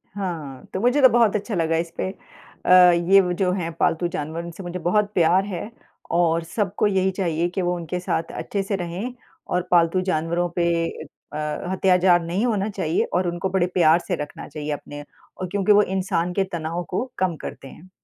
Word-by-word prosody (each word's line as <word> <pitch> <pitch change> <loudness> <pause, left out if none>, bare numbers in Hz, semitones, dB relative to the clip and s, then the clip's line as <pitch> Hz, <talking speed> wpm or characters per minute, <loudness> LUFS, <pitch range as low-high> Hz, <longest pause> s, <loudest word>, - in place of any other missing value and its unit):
हाँ, 165 -9 -5
तो 190 - -2
मुझे 250 +5 +3
तो 260 - +8
बहुत 230 -3 +3
अच्छा 210 +1 -2
लगा 165 -1 +1
इसपे 170 +2 -3 0.6
अ, - - -1 0.4
ये 195 - +8
व 180 -1 -1
जो 185 -2 +2
हैं 170 -3 -2
पालतू 175 +2 +2
जानवर 165 0 -4
इनसे 170 +3 -9
मुझे 175 +1 -5
बहुत 205 +4 +1
प्यार 185 +2 +3
है 205 +3 -5 0.5
और 170 -1 +2
सबको 205 +3 -1
यही 190 -1 +1
चाहिए 175 -3 -1
कि 185 +1 -3
वो 180 0 0
उनके 175 +1 -4
साथ 165 -2 -2
अच्छे 200 -1 -2
से 200 +1 -2
रहें 185 +7 -4 0.3
और 180 - -1
पालतू 170 +1 +4
जानवरों 175 -1 0
पे 175 - +1 0.2
ए - - -2 0.4
अ, - - -4
अत्याचार 180 +3 +2
नहीं 185 +8 0
होना 210 -3 0
चाहिए 165 -5 0
और 180 0 +1
उनको 175 +2 -2
बड़े 185 -1 +1
प्यार 170 -1 +5
से 180 - 0
रखना 145 - -7
चाहिए 150 -1 -5
अपने 145 0 -8 0.3
और 185 - -4
क्योंकि 200 +1 +2
वो 205 - +7
इंसान 180 -2 -1
के 195 - +1
तनाव 170 +1 -3
को 190 +7 -1
कम 185 -3 +1
करते 135 - -8
हैं। 165 +7 -14
180 Hz, 195 wpm, -23 LUFS, 165-195 Hz, 0.6 s, तो